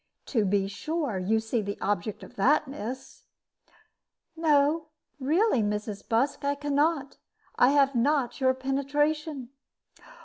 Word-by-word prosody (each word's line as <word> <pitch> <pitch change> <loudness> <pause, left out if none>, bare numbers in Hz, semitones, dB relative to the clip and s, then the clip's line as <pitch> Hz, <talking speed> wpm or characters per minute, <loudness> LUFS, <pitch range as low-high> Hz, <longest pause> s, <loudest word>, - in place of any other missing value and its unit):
To 220 -5 +3
be 195 0 +1
sure 280 - -3
you 215 +5 +1
see 220 +1 -1
the 200 0 -4
object 205 0 -2
of - - -13
that, 290 +8 +3
miss?" 265 -1 -7 1.1
"No, 310 0 +2 0.3
really, 305 - +2
Mrs. 210 0 -3
Busk, 260 +7 +1
I 285 0 +1
can 290 0 -3
not. 290 -1 +1 0.4
I 245 - +5
have 280 -1 +4
not 265 +1 +1
your 260 0 +3
penetration." 280 +1 -1
270 Hz, 130 wpm, -27 LUFS, 220-295 Hz, 1.1 s, I